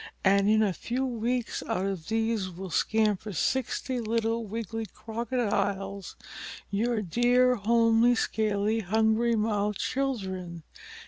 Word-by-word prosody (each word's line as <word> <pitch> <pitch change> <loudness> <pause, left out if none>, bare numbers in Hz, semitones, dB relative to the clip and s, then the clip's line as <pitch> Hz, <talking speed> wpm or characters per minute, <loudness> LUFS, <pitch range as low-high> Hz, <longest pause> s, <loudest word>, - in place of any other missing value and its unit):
And 200 +1 +4
in 220 0 +4
a 200 -3 +1
few 250 +8 -2
weeks 240 0 -2
out 185 - -1
of 190 -5 -4
these 225 -3 0
will 185 +1 -8
scamper 215 -1 +1
sixty 260 - -1
little 230 0 -1
wiggly 225 +1 -4
Crocodiles, 205 -5 -2 0.6
your 220 +2 0
dear, 245 +6 +3
homely, 230 +2 +3
scaly, 215 -1 0
hungry 220 +3 +2
mouthed 210 -1 0
children. 190 -11 -3
220 Hz, 115 wpm, -28 LUFS, 200-235 Hz, 0.6 s, And